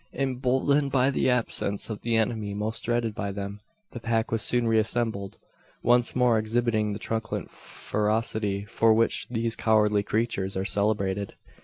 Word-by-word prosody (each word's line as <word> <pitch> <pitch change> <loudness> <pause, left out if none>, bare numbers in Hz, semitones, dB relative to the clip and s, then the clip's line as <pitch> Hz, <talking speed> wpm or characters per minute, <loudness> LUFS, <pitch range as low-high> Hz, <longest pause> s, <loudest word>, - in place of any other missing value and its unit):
Emboldened 135 +2 +1
by 130 0 +3
the 130 - +1
absence 115 -4 0
of 110 -2 -6
the 115 -1 0
enemy 110 -2 -1
most 110 +2 -3
dreaded 120 -2 0
by 100 -1 -3
them, 100 +1 -6 0.3
the 120 - -7
pack 115 -1 -1
was 115 -1 +1
soon 120 +1 +2
reassembled, 110 -2 0 0.5
once 120 0 +3
more 125 -3 +3
exhibiting 110 -1 0
the - - -4
truculent 115 +1 -4
ferocity 105 -1 -2
for 110 +1 +3
which 115 +1 +1
these 115 -1 -1
cowardly 105 -2 +3
creatures 100 -3 -1
are 95 - -1
celebrated. 100 -1 0
110 Hz, 150 wpm, -26 LUFS, 105-120 Hz, 0.5 s, by